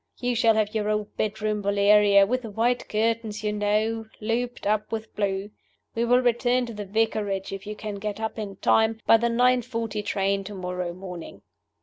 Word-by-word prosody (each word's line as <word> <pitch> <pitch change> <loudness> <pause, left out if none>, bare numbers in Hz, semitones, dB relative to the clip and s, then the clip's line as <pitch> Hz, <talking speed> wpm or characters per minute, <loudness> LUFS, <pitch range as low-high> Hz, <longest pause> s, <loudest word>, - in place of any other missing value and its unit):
You 245 0 0
shall 225 -1 +4
have 215 -1 0
your 210 -1 -1
old 210 -1 -2
bedroom, 215 0 -1
Valeria, 200 0 +5
with 255 +5 -1
the 230 - -7
white 235 +4 0
curtains, 220 -1 -1
you 210 0 0
know, 215 +2 0
looped 240 +3 -2
up 210 +1 0
with 220 -1 -5
blue! 200 0 -2 0.4
We 235 - 0
will 245 +1 +4
return 245 +1 +2
to 235 - -7
the 205 -1 -6
Vicarage 205 -2 -1
(if 195 +1 -7
you 210 - -5
can 210 -1 -6
get 210 0 -4
up 220 0 -3
in 200 -2 -5
time) 220 +3 +2
by 225 - +7
the 235 +1 0
nine 250 +2 +3
forty 225 -3 -3
train 195 -1 0
to 205 +1 -7
morrow 180 -1 -3
morning." 180 -2 -9
215 Hz, 195 wpm, -25 LUFS, 205-230 Hz, 0.4 s, by